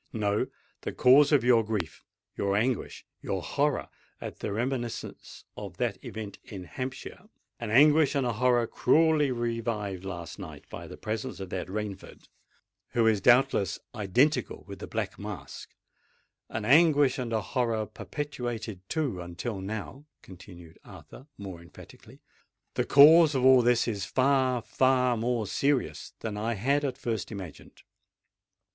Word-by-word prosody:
No—the 105 -2 -3
cause 140 +4 +6
of 145 -4 +4
your 120 -2 +5
grief—your 100 0 -4
anguish—your 120 +2 -3
horror - - 0 0.3
at - - -8
the 105 - -3
reminiscence 120 +1 -4
of - - -8
that - - -2
event 105 -2 -7
in 95 -3 -9
Hampshire,—an 125 +3 -8
anguish 150 +5 +5
and 135 -2 +1
a 120 - 0
horror 120 +1 +2
cruelly 155 +4 +3
revived 115 -5 -3
last 85 -1 -7
night 80 -7 -10
by - - -8
the - - -10
presence 110 -2 -4
of 95 -2 -7
that 90 - -3
Rainford, 100 0 -6 0.7
who 115 -1 +3
is 110 -3 +3
doubtless 120 -5 +3 0.2
identical 120 +8 +1
with 100 -1 -9
the - - -7
Black 110 -4 -4
Mask,—an 105 +3 -10
anguish 145 -1 +5
and 120 -2 -3
a 110 -1 0
horror 115 -3 -1
perpetuated, 120 - -5
too, 135 - -2
until 85 +5 -5
now," 110 +8 -6 0.2
continued 90 -3 -13
Arthur, 135 - -13
more 95 -4 -8
emphatically,—"the 85 +1 -10
cause 155 +2 +7
of 130 -1 +1
all 130 -1 +7
this 120 0 +2
is 105 -4 -2
far—far 130 0 +2
more 115 0 -1
serious 140 +5 -1
than 110 -2 -4
I 115 +2 -1
had 140 +8 +1
at 135 -2 -2
first 115 -5 -3
imagined. 95 -6 -10
115 Hz, 130 wpm, -28 LUFS, 100-130 Hz, 0.7 s, cause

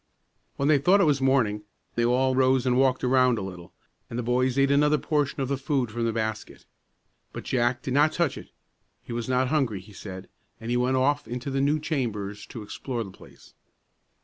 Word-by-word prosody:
When 140 - -1
they 150 -2 +5
thought 180 +8 +4
it - - +5
was 145 -4 +2
morning, 125 -6 +2 0.3
they 120 - 0
all 130 +2 +2
arose 130 0 +3
and 125 -1 +2
walked 130 0 +2
around 125 -1 +3
a 105 - -3
little, 90 -2 -9 0.4
and 115 - -5
the 125 - -2
boys 125 +2 +1
ate 135 0 +3
another 150 +1 +4
portion 145 -2 -1
of 135 - -1
the 140 +1 -1
food 135 -5 -1
from 115 +1 -2
the 115 - +1
basket. 110 -1 -4 0.7
But - - -7
Jack 120 0 0
did 130 -4 -3
not 145 +3 +4
touch 170 -3 0
it; - - -10 0.5
he - - -7
was 120 +1 -4
not 130 0 +1
hungry, 130 -9 0
he 100 +3 -15
said, 95 -1 -9 0.3
and 115 +1 -5
he - - +1
went 125 +1 +1
off 145 +3 +1
into 125 +3 -5
the 135 0 0
new 145 +2 +2
chambers 110 -10 -3
to 115 - -8
explore 120 +3 -4
the 100 - -10
place. - - -17
130 Hz, 210 wpm, -26 LUFS, 115-140 Hz, 0.7 s, they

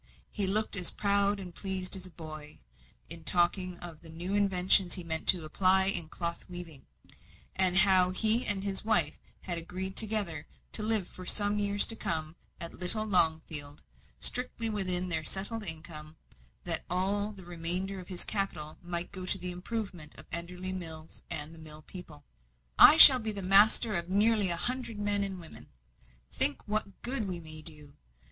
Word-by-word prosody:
He 200 -3 -2
looked 215 +3 +3
as 180 -3 +1
proud 200 0 -1
and 180 -2 -11
pleased 190 0 +1
as 190 -1 -8
a - - -15
boy, 155 -2 -12 0.5
in 165 - -2
talking 180 +1 +1
of 170 -3 -12
the 165 - -13
new 175 +4 -7
inventions 190 -2 +3
he 180 - -6
meant 160 -1 0
to 175 -4 +8
apply 190 +4 +1
in 175 -5 +1
cloth 170 0 -7
weaving; 175 -6 -12 0.7
and 185 -1 +1
how 190 -2 +5
he 220 +6 +5
and 195 -2 +2
his 195 -1 -3
wife 220 +1 +2 0.2
had 175 -2 -5
agreed 190 +3 -7
together 205 -8 +2 0.2
to - - 0
live 215 -3 -1
for 185 -1 -12
some 205 0 +2
years 205 0 -1
to 225 - +2
come 160 -5 -4 0.2
at 170 -2 -9
little 215 +4 0
Longfield, 160 -6 0 0.4
strictly 245 -2 -2
within 185 -3 -2
their 160 -2 -2
settled 200 +6 -4
income, 160 -4 -6 0.5
that - - -1
all 200 +4 -3
the 190 -3 -15
remainder 175 +3 -2
of 180 - -13
his 180 -2 -3
capital 175 -7 -5
might 175 0 -4
go 185 -2 -8
to 190 - +1
the 180 -1 -5
improvement 180 -4 -8
of - - -13
Enderley 180 +2 -4
Mills 160 -3 -7
and 160 0 -7
mill 155 -1 -11
people. 155 -6 -13 0.5
"I 315 - +7
shall 265 -5 +12
be 220 -2 -2
master 205 +3 +2
of 170 -2 -4
nearly 205 0 +1
a 170 - -2
hundred, 245 0 -5
men 205 -1 -3
and 190 -2 -7
women. 165 -2 -12 0.6
Think 140 - 0
what 210 -2 -5
good 240 -4 -2
we 180 -2 -7
may 155 -1 -12
do! 150 -3 -10
185 Hz, 170 wpm, -27 LUFS, 170-200 Hz, 0.7 s, shall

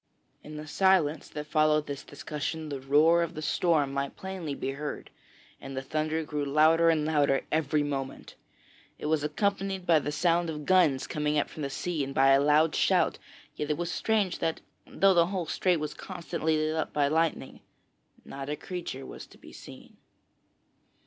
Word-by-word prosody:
In 150 0 -9
the 150 - -7
silence 165 -2 +2
that 150 0 -6
followed 155 0 +2
this 140 -2 -6
discussion, 150 +2 -5
the 140 -2 -4
roar 155 +5 +4
of 170 0 -3
the 155 - -5
storm 155 -3 +1
might 140 0 -3
plainly 185 -6 -5
be 135 - -3
heard, 145 +2 -6 0.5
and 135 -1 -8
the 135 - -3
thunder 155 +3 -1
grew 150 -1 -3
louder 155 +4 +4
and 155 -2 +2
louder 145 -3 +2
every 150 -1 +1
moment. 135 -2 -5 0.6
It - - -8
was 155 -1 +1
accompanied 195 +4 -1
by 165 -3 +5
the 145 - -4
sound 170 +2 +1
of 150 -2 -5
guns 170 -8 +3
coming 150 0 -1
up 145 - 0
from 155 - -8
the 140 - -2
sea 160 +1 -2
and 135 0 -6
by 135 0 +5
a 135 0 +5
loud 150 +2 +3
shout, - - +2 0.4
yet 150 - -4
it 150 - 0
was 175 0 -3
strange 210 -4 0
that, 160 - -2 0.3
though 195 0 +3
the 170 -1 +4
whole 185 -2 -3
strait 180 +2 +1
was 150 -1 -4
constantly 170 -3 -3
lit 155 +1 0
up 160 - -2
by 145 -1 +2
lightning, 160 +2 -1 0.7
not 135 0 -7
a 150 - -1
creature 165 -6 -6
was - - -10
to - - -18
be - - -15
seen. - - -13
155 Hz, 185 wpm, -28 LUFS, 145-170 Hz, 0.7 s, by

